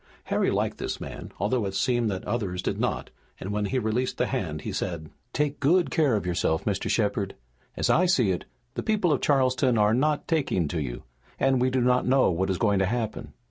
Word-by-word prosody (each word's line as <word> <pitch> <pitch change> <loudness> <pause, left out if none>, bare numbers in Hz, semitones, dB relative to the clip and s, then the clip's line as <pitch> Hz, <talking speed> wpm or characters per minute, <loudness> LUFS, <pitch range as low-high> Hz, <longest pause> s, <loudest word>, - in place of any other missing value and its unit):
Harry - - +1
liked - - -1
this - - -3
man, - - -8
although 110 +5 0
it 95 - -5
seemed 120 +2 +1
that 95 -2 -4
others 95 -4 -2
did - - -2
not, - - -2 0.3
and 95 - -5
when 105 0 -1
he 130 - -1
released 125 +2 -1
the - - +2
hand - - -3
he - - -4
said: 85 -4 -4 0.2
"Take 145 +1 -1
good 170 +5 +3
care 150 -8 +3
of 100 - -2
yourself, 85 -2 0
Mr. 100 -2 -1
Shepard. 100 -3 0 0.4
As - - +1
I 180 +3 +4
see 125 - +3
it, 90 - -3 0.3
the - - -3
people 205 -7 +2
of 135 - -1
Charleston 130 -3 +2
are 105 0 +4
not 145 +4 +1
taking 140 - +1
to 80 -1 -2
you, 60 -4 -5 0.4
and 135 -2 +3
we 130 - +3
do 130 0 +1
not 125 +1 +2
know 130 -5 +4
what 95 +3 -1
is 95 - 0
going 100 -2 +2
to 95 - +2
happen." 115 0 -3
115 Hz, 220 wpm, -26 LUFS, 95-130 Hz, 0.4 s, I